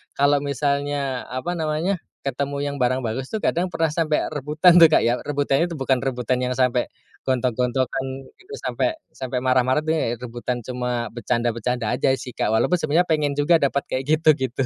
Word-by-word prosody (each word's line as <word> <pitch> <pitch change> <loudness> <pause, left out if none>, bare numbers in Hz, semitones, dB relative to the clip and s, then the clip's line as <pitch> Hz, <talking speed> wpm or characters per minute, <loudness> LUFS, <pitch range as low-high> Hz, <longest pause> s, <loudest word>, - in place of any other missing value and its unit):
kalo 145 +1 +3
misalnya 140 -1 -1
apa 130 +7 -4
namanya, 160 +5 -1 0.2
ketemu 140 +1 -3
yang 145 0 -2
barang 130 -1 +1
bagus 125 +2 -4
tuh 220 - -2
kadang 180 -2 0
pernah 165 -1 +1
sampe 155 0 0
rebutan 155 +4 +3
tuh 165 -2 +8
Kak - - +6
ya. 120 - +3
Rebutan 145 +3 0
tuh 160 - -6
bukan 135 -1 +1
rebutan 130 -1 -1
yang 125 - -1
sampe 125 -1 +1 0.3
gontok-gontokan 130 +1 0 0.3
gitu, 375 +3 -15
sampe 320 - -1 0.2
sampe 130 -1 -3
marah-marah 130 +1 +2
tuh 160 +1 0
ya 120 -7 -1
rebutan 120 0 -4
cuma 125 -2 -2
becanda-becanda 120 0 -1
aja 130 - +2
sih, 125 0 -8
Kak. - - 0
Walaupun 110 +11 +2
sebenernya 170 +1 +1
pengen 150 -3 +1
juga 145 +4 +4
dapet 140 0 +1
kayak 130 - -2 0.2
gitu, 160 - +3
gitu. 130 -1 -3
135 Hz, 175 wpm, -23 LUFS, 125-155 Hz, 0.3 s, tuh